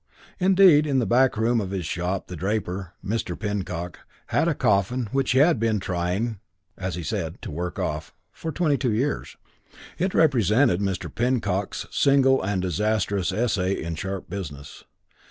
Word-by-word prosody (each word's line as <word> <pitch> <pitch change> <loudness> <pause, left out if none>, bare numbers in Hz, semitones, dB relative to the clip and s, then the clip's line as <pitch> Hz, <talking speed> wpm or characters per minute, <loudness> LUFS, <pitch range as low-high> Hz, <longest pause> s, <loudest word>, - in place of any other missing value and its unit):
Indeed 180 -5 +6
in 140 -2 +1
the 125 - +2
back 125 +3 +3
room 115 +1 +2
of 95 - -4
his 95 -3 -3
shop, 90 +4 -2
the 90 - -8
draper, 95 -1 -3
Mr. 100 -4 -2
Pinnock, 90 -5 -4 0.3
had - - +2
a - - +1
coffin 105 +5 +1
which 135 -2 +1
he - - +2
had 150 0 +5
been 110 -2 +1
trying 95 +4 -2 0.4
(as 95 -2 -4
he 90 - -5
said) 85 -4 -3
"to - - -5
work 90 +3 -4
off" 75 0 -3 0.2
for 160 - -5
twenty 150 -3 +1
two 125 -5 0
years. 135 +6 -2 0.6
It 185 +3 0
represented 120 - +3
Mr. 95 -2 -3
Pinnock's 115 -5 -1
single 135 -1 +4
and 95 -1 -1
disastrous 100 0 0
essay 100 -3 0
in 85 +1 -4
sharp 95 +3 -5
business. 75 -8 -8
100 Hz, 160 wpm, -24 LUFS, 90-125 Hz, 0.6 s, Indeed